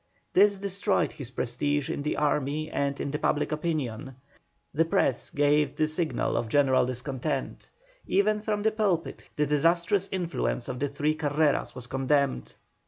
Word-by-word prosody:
This 200 +1 +5
destroyed 200 +1 0
his 140 -6 -7
prestige 130 +3 -1
in - - -3
the 150 - -2
army 150 +1 0
and 140 0 -1
in 140 - -3
public 150 0 0
opinion; 145 -5 -3 0.6
the 160 - +3
Press 140 -5 +1
gave 145 0 +2
the 155 +1 +1
signal 155 +1 -1
of 115 - -2
general 130 -1 +3
discontent; 130 +1 -4 0.4
even 210 +2 +2
from 210 -1 -2
the 220 - +3
pulpit 200 -7 -1
the 150 - +2
disastrous 170 +6 +2
influence 165 - -2
of 125 -1 -4
the 145 - 0
three 145 +2 0
Carreras 150 -1 0
was 125 - -7
condemned. 135 - 0
150 Hz, 150 wpm, -27 LUFS, 135-170 Hz, 0.6 s, This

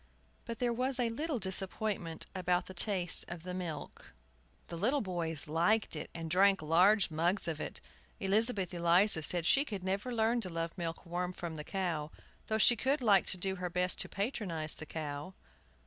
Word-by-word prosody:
But 230 -1 -5
there 240 0 0
was 255 +2 -1
a 235 -2 +1
little 295 +4 -2
disappointment 190 -3 0
about 180 -1 0
the 190 - -9
taste 185 -2 +3
of 170 -1 -8
the 180 0 -6
milk. 175 -5 -7 0.5
The - - -8
little 250 - +1
boys 170 -6 -2
liked 175 +8 +1
it, - - -6
and 165 -1 -5
drank 195 +2 +3
large 180 +5 +4
mugs 170 +6 +1
of 160 -2 -3
it. - - -4 0.4
Elizabeth 195 -2 +2
Eliza 170 +1 +4
said 170 +2 0
she 275 +10 +4
could 205 -9 -6
never 195 +6 -2
learn 230 +1 +1
to 185 - -2
love 165 0 -4
milk 170 -2 -5
warm 180 +1 -3
from 170 -2 -6
the 150 - -6
cow, 170 -5 -3 0.4
though 220 - 0
she 240 +2 +6
would 270 +1 +1
like 200 -4 +4
to 190 - 0
do 190 +1 -1
her 180 0 -3
best 180 +1 0
to - - +2
patronize 195 - -1
the 155 - -9
cow. 150 +3 -6
185 Hz, 185 wpm, -32 LUFS, 165-215 Hz, 0.5 s, she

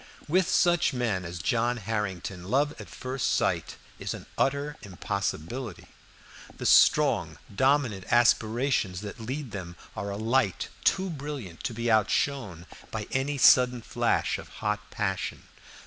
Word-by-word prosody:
With 185 +3 +2
such 175 -5 +3
men 115 -7 -1
as 85 +1 -6
John 120 +8 +1
Harrington 95 -4 -3
love 140 +8 +1
at 100 - -11
first 130 +10 -2
sight - - 0 0.2
is - - -3
an - - -10
utter 140 +2 0
impossibility. 100 +3 -4 0.7
The - - -6
strong - - +4 0.2
dominant 130 -6 +2
aspirations 115 -4 +2
that 105 +3 -7
lead 130 +3 -5
them 90 -3 -6 0.2
are 100 - -4
a 100 - -4
light 110 -3 +1
too 190 -1 +2
brilliant 140 - -7
to 115 - -2
be 115 +1 0
outshone 110 - +1 0.2
by - - -4
any 140 +2 0
sudden 125 -2 +6
flash - - 0
of - - -10 0.2
hot 105 0 -1
passion. 95 -4 -3
115 Hz, 135 wpm, -28 LUFS, 100-135 Hz, 0.7 s, sudden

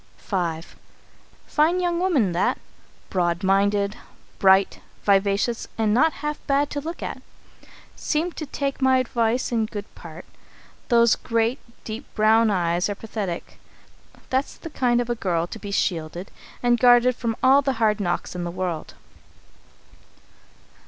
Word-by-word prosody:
V. 170 -5 -2 0.8
"Fine 320 +4 +2
young 350 -1 0
woman, 305 - +2
that. 175 +2 +1 0.5
Broad 175 0 0
minded, 200 +1 +2 0.4
bright, 190 0 +4 0.2
vivacious, 200 +3 +1
and 220 -2 +2
not 315 +8 +4
half 300 0 -2
bad 280 +1 +1
to 290 - -3
look 330 +4 -6
at. - - -5 0.7
Seemed 330 +3 -2
to 310 - -5
take 275 0 -3
my 260 0 +4
advice 240 -1 0
in 225 -2 +1
good 205 -1 -6
part. 165 +1 -11 0.6
Those 235 -2 +5
great, 230 +2 0 0.2
deep 220 +4 -6
brown 220 +1 +4
eyes 175 -1 0
are 205 - -2
pathetic. 205 -5 -6 0.7
That's 265 +2 0
the 330 - -9
kind 245 -3 +2
of 240 - -5
a - - +3
girl 175 -7 -1
to 220 - -9
be 205 - -7
shielded 175 -2 -2 0.3
and 240 -1 +3
guarded 245 0 +5
from 230 -2 -2
all 270 +2 +6
the 270 -1 0
hard 220 -3 +1
knocks 175 -3 -2
in 175 - -3
the 175 - -3
world. 175 -2 -4
225 Hz, 145 wpm, -23 LUFS, 190-260 Hz, 0.8 s, all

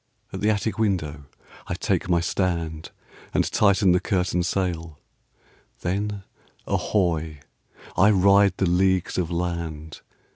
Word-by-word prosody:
At - - -5
the 105 - +2
attic 110 +1 -1
window 80 -9 -1 0.4
I - - -2
take - - -1
my 85 -1 +3
stand. 85 -3 -2 0.5
And - - +4
tighten 100 -2 +4
the 90 - +4
curtain 90 -4 0
sail, 85 -4 -2 0.8
Then, 100 +3 -2 0.4
ahoy! 80 -7 -1 0.5
I 100 +3 +5
ride 100 -1 +4
the 95 - +1
leagues 95 +1 +1
of 85 -3 -1
land. 85 -3 -4
90 Hz, 120 wpm, -24 LUFS, 85-100 Hz, 0.8 s, I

